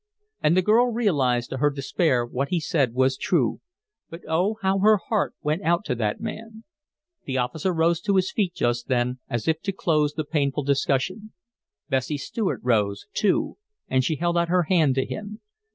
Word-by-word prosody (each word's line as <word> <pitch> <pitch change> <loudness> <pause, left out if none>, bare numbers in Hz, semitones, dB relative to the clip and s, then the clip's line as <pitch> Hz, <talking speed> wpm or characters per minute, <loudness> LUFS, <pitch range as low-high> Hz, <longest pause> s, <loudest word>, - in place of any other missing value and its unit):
And 165 +4 +3
the 185 - +4
girl 225 +5 +4
realized 140 - +1
to 130 - -3
her 145 +3 +3
despair 140 -2 0
what 130 +3 -2
he 180 - +1
said 140 -6 0
was 130 +1 +2
true; 140 -11 0 0.5
but 165 +2 -9
oh! 185 +7 +1
how 190 0 +2
her 215 +2 +5
heart 210 +1 -2
went 155 +5 0
out 170 +2 +1
to - - -1
that 110 -3 -2
man! 225 0 -7 0.6
The 130 -1 -2
officer 140 +9 -1
rose 165 0 +1
to 200 +1 0
his 190 0 +2
feet 190 -5 -1
just 120 0 -1
then, 125 0 0
as 120 0 -3
if 160 0 +1
to 200 - -2
close 155 -5 +1
the 155 - -2
painful 145 -1 -1
discussion. 140 +9 -1 0.5
Bessie 135 +1 -1
Stuart 195 +8 -3
rose, 105 -5 +1
too, 300 - 0 0.3
and 130 0 +2
she 155 - 0
held 170 +2 0
out 170 0 0
her 180 0 +3
hand 155 -5 +2
to 130 - +1
him. 210 0 -7
160 Hz, 185 wpm, -24 LUFS, 130-190 Hz, 0.6 s, her